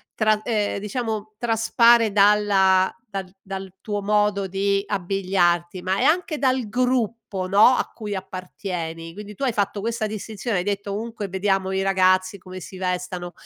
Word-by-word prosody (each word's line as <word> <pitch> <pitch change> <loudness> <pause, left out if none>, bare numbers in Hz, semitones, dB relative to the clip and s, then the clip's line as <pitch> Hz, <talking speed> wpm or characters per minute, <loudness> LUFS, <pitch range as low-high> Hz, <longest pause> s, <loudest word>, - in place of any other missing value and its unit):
tra 215 -1 +2
ehm 210 -3 -1
diciamo 215 0 -4
traspare 230 0 +4
dalla 200 -2 +4 0.2
dal 190 -2 -6
dal 190 -1 -7
tuo 205 -1 -3
modo 205 -1 +1
di 195 +1 0
abbigliarti, 185 -2 0
ma 190 +2 0
è - - +1
anche 335 -1 +2
dal 260 -4 +1
gruppo 235 -6 -1
no, 205 +4 +6
a - - -1
cui 210 -3 -5
appartieni. 175 -3 -6
Quindi 210 +1 -9
tu 275 - -6
hai 250 -4 +1
fatto 200 -1 -1
questa 225 0 -2
distinzione, 215 0 -4
hai 180 - 0
detto:" 200 0 -3
Ovunque 220 0 -4
vediamo 190 0 0
i 190 0 0
ragazzi 185 0 +2
come 185 0 -10
si 185 +2 -10
vestano," 180 -1 -3
200 Hz, 155 wpm, -23 LUFS, 185-215 Hz, 0.2 s, no